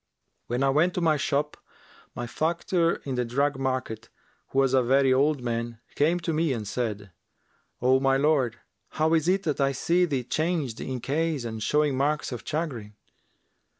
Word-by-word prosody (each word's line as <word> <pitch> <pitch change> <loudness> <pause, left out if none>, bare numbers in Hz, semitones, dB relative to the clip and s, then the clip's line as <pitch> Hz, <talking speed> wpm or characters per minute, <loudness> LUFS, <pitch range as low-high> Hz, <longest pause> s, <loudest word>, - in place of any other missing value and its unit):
When 120 +3 -1
I 135 - +3
went 165 +6 +2
to - - 0
my 160 -2 +3
shop, 145 +1 -1 0.6
my 120 - -4
factor 170 +5 0
in 135 - -3
the 125 -1 0
drug 135 +4 0
market, 130 -4 -3 0.4
who - - -6
was 135 -1 +3
a 130 - +5
very 135 +2 +3
old 140 0 +2
man, 115 -1 -3
came 165 +5 +2
to 165 -1 -2
me 155 -2 +1
and 110 -4 -4
said, 105 -4 -3 0.7
'O 130 +1 +4
my 135 0 +3
lord, 135 -6 +2 0.4
how 155 +1 +2
is 160 0 +2
it 190 +2 +2
that 150 -3 -1
I 135 0 +2
see 175 +7 +2
thee 140 -7 -2
changed 155 -3 -2
in 130 -2 -4
case 155 -1 -1
and 110 -1 -5
showing 150 +2 +2
marks 145 +2 0
of 120 - -5
chagrin? 130 -10 -4
135 Hz, 180 wpm, -26 LUFS, 125-155 Hz, 0.7 s, a